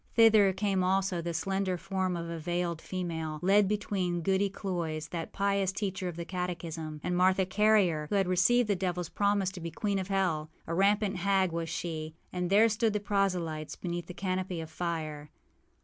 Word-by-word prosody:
Thither 220 -4 +6
came 190 -1 0
also 190 -1 +1
the 170 0 -3
slender 190 +2 -1
form 185 -1 -2
of 170 0 -4
a 165 0 -5
veiled 175 0 -2
female, 165 -4 -4
led 200 +2 +5
between 190 -4 -1
Goody 195 +2 +2
Cloyse, 165 -5 -3
that 165 -2 -5
pious 200 -1 +1
teacher 190 -2 -3
of 175 - -4
the 170 0 -5
catechism, 165 -4 -4
and 180 - -1
Martha 185 +1 +3
Carrier, 190 -6 +3
who - - 0
had 195 -2 +2
received 215 +7 +3
the 205 - +2
devilâs 180 -2 -3
promise 200 -2 +1
to 190 - -8
be 170 - -4
queen 200 +4 -1
of 185 - -4
hell. 180 -6 0 0.2
A 165 - -4
rampant 200 +2 +2
hag 190 -1 +2
was 165 0 -3
she. 160 -1 -4 0.2
And 180 -1 -1
there 210 +4 +6
stood 220 0 +1
the 210 - 0
proselytes 185 -6 -1
beneath 175 -1 -4
the 180 - -8
canopy 185 -2 -2
of 160 -1 -7
fire. 155 -4 -4
185 Hz, 185 wpm, -30 LUFS, 170-195 Hz, 0.2 s, Thither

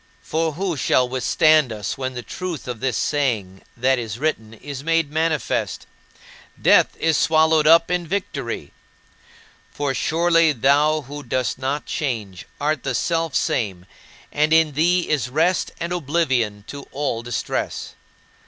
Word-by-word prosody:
" - - -35
For 160 0 +1
who 185 +1 -2
shall 125 -1 +2
withstand 135 +3 +3
us 105 -3 -4
when 130 -1 -4
the 120 - -5
truth 180 -2 -6
of 120 -3 -5
this 130 -2 -1
saying 110 -10 -1 0.2
that 130 +2 +2
is 115 -2 -5
written 115 -6 -2
is 140 +3 -8
made 165 -2 +1
manifest: 160 -1 -1 0.7
"Death - - +4
is 160 -2 +2
swallowed 160 -1 +3
up 165 +2 +6
in 175 -1 -1
victory"? 140 - -4 1.0
For 145 -2 -2
surely 165 +2 +3
thou, 145 +4 +3
who 145 +2 -8
dost 130 -1 -2
not 135 +3 -2
change, 110 - -4
art 150 -1 0
the - - -2
Selfsame, 130 - -1 0.5
and 150 +1 +1
in 160 -1 +4
thee 175 +5 +2
is 140 -5 0
rest 165 +7 +1
and 170 +1 -3
oblivion 135 -10 0
to 140 -1 -8
all 135 -5 -2
distress. 120 0 -3
145 Hz, 145 wpm, -22 LUFS, 125-160 Hz, 1.0 s, up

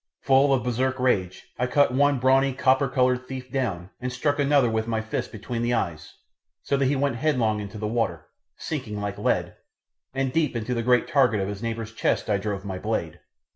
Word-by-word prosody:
Full 135 +1 +4
of 130 -2 +2
Bersark 130 +2 0
rage, 95 -8 -1
I 125 - +1
cut 140 0 +3
one 145 +1 +3
brawny 135 +1 +3
copper 130 +1 +3
coloured 125 0 +1
thief 130 -1 -7
down, 105 -9 -2
and 125 0 -3
struck 145 +3 -1
another 140 -2 +4
with 110 0 -1
my 115 -1 0
fist 110 0 -4
between 115 +2 -5
the 120 +1 +1
eyes 85 -8 -3 0.5
so 140 - 0
that 135 -1 +2
he 140 - +1
went 140 -3 0
headlong 120 -7 +1
into 105 +1 -7
the 105 - -4
water, 115 +1 -1 0.3
sinking 120 -9 -4
like 100 0 -4
lead, - - 0 0.5
and 135 -1 -2
deep 155 -5 +1
into 115 +2 -2
the 115 - -1
great 125 +1 +3
target 125 -7 +3
of 95 - -1
his 100 0 -6
neighbour's 115 -1 -4
chest 115 - 0
I 100 - +3
drove 100 -1 -4
my 95 -2 -4
blade. - - -3
125 Hz, 205 wpm, -25 LUFS, 110-135 Hz, 0.5 s, Full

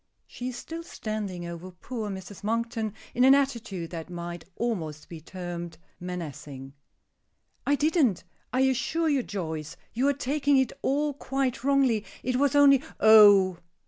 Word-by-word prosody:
She 250 - -7
is 245 - -7
still 330 +5 -7
standing 215 - -5
over 170 +1 -7
poor 215 +4 -6
Mrs. 190 0 -8
Monkton 225 -1 -2 0.2
in 250 - +2
an 265 +1 +8
attitude 235 -11 -2
that 165 0 -6
might 175 -1 -6
almost 165 -11 -3
be 165 -2 -9
termed 175 -1 -7 0.2
menacing. 150 -6 -7 0.9
"I 285 - +4
didn't. 295 - +2 0.3
I 255 - +1
assure 265 +5 +1
you, 280 -3 +2
Joyce, 160 -6 -5 0.2
you 255 +4 +1
are 285 - +3
taking 280 +1 +1
it 265 -2 +1
all 290 +2 0
quite 265 -3 -2
wrongly. 270 -6 +3 0.2
It 255 0 0
was 285 +1 +2
only 280 -2 +6 0.2
" - - -41
"Oh! 205 -4 +7
220 Hz, 150 wpm, -27 LUFS, 175-270 Hz, 0.9 s, an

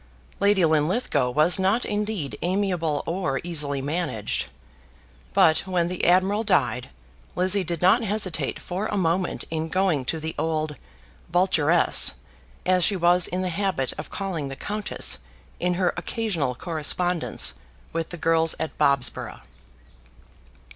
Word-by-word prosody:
Lady 200 -3 +4
Linlithgow 155 - +1
was 155 +8 +3
not 195 +6 +2
indeed 205 - -2
amiable 175 -4 0
or 165 -6 -1
easily 145 -5 -2
managed. 145 - -2 0.8
But 155 - +5
when 175 -2 0
the 180 - -2
admiral 190 +4 +3
died, 125 - +1 0.5
Lizzie 185 +2 +3
did 170 -1 -4
not 195 +7 +5
hesitate 205 -5 -1
for 190 +4 -3
a 205 - -2
moment 180 0 0
in 160 0 -2
going 180 -7 +1
to 160 +5 -2
the 160 +1 -4
old 155 -1 -1 0.6
"vulturess," 175 -2 +3 0.5
as 185 -1 +3
she 200 - +4
was 175 0 +3
in 185 +1 -2
the 185 - -1
habit 180 -7 -1
of 150 - -6
calling 185 -8 -4
the 135 - -6
countess 210 +8 -1 0.4
in 180 0 0
her 180 -1 +1
occasional 175 - -2
correspondence 155 - 0 0.4
with 165 -1 -2
the 175 - -7
girls 165 0 +2
at 160 - -4
Bobsborough. 140 -3 +1
175 Hz, 135 wpm, -24 LUFS, 155-190 Hz, 0.8 s, But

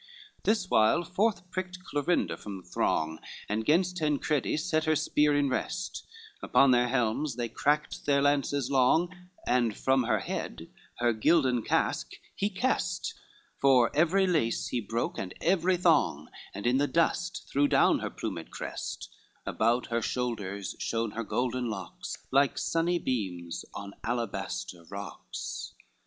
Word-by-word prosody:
XXI - - -32
This 215 -4 +2
while 110 +11 +4
forth 190 +2 0
pricked 185 0 -5
Clorinda 145 +1 0
from 100 -2 -7
the - - -23
throng 80 0 0 0.3
And 105 +2 -1
'gainst 180 +6 +2
Tancredi 150 -2 0
set 155 0 0
her 155 0 +3
spear 150 -1 +2
in 145 -1 +2
rest, 135 +7 -3 0.3
Upon 135 -1 +4
their 125 0 +4
helms 125 +2 0
they 120 -1 -2
cracked 145 +7 -1
their 140 -1 +4
lances 140 -1 +1
long, 160 +7 +3 0.3
And 120 -4 +1
from 130 -2 +2
her 120 - +2
head - - -5 0.2
her 120 -1 +2
gilden 130 0 +3
casque - - 0 0.2
he 200 - 0
kest, 245 +6 -1 0.5
For 130 -4 +4
every 175 +5 +4
lace 155 -11 +1
he 120 - -1
broke 115 +3 -2
and 95 -1 -5
every 180 +1 +2
thong, 155 - +2 0.3
And 100 - -6
in 125 +2 +3
the 145 +1 +2
dust 170 +4 0
threw 145 +1 +3
down - - +4
her - - -3
plumed - - -5
crest, - - -5 0.4
About 115 +3 +1
her 115 0 +1
shoulders 105 -6 -3
shone 115 -1 -1
her 115 +2 -4
golden 125 +2 -1
locks, 95 -5 -6
Like 140 +1 +3
sunny 170 +1 +1
beams, 90 - -3
on 100 0 -7
alabaster 115 -6 -3
rocks. 100 0 -6
135 Hz, 145 wpm, -29 LUFS, 115-165 Hz, 0.5 s, while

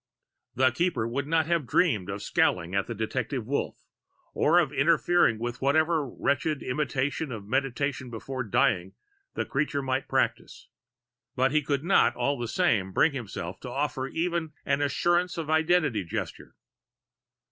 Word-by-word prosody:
The 130 +1 +4
Keeper 130 -5 0
would 140 +4 -3
not 160 0 +2
have 165 -5 0
dreamed 110 - +2
of 100 +1 -5
scowling 85 +2 +1
at 100 0 0
the 115 - -4
detected 115 +2 -3
Wolf 140 +5 -3 0.5
or 165 +3 +3
of 160 -6 +2
interfering 165 -3 +3
with 120 +2 -5
whatever 155 +1 +2
wretched 140 +3 -1
imitation 135 +2 -2
of 110 -4 -6
meditation 135 +2 -1
before 130 +3 -5
dying 110 -5 +1 0.4
the - - -1
creature 140 0 -1
might 130 0 -1
practice. - - -2 0.7
But 130 +1 +2
he 155 +1 +3
could 140 0 -1
not, 180 - +3
all 140 +3 0
the 120 - -3
same, 115 - +1
bring 160 - +4
himself 100 -9 -6
to 125 - -8
offer 135 0 -2
even 165 0 -2
an 140 0 +1
assurance 175 +5 +1
of 160 -2 -3
identity 160 - +2
gesture. 85 - -6
135 Hz, 150 wpm, -27 LUFS, 120-155 Hz, 0.7 s, The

